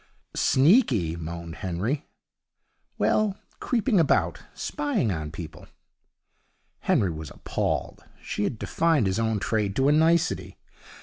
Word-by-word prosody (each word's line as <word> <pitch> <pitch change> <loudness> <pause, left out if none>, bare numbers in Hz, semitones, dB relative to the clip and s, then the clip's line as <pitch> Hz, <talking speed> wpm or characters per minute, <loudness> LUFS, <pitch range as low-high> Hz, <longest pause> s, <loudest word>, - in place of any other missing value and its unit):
'Sneaky!' 130 - +3
moaned 85 0 -6
Henry. 100 - -2 0.9
'Well, 210 -2 +2 0.2
creeping 230 -4 +1
about, 160 - +2 0.2
spying 280 - -1
on 80 -3 -3
people.' 80 0 -9 1.1
Henry 95 -4 +2
was 80 -2 -7
appalled. - - -3 0.2
She 105 - -3
had 110 - -1
defined 160 0 +1
his 95 +2 0
own 110 -1 +1
trade 105 -1 -1
to 135 +1 +3
a - - +5
nicety. 165 +3 +2
110 Hz, 115 wpm, -26 LUFS, -, 1.1 s, a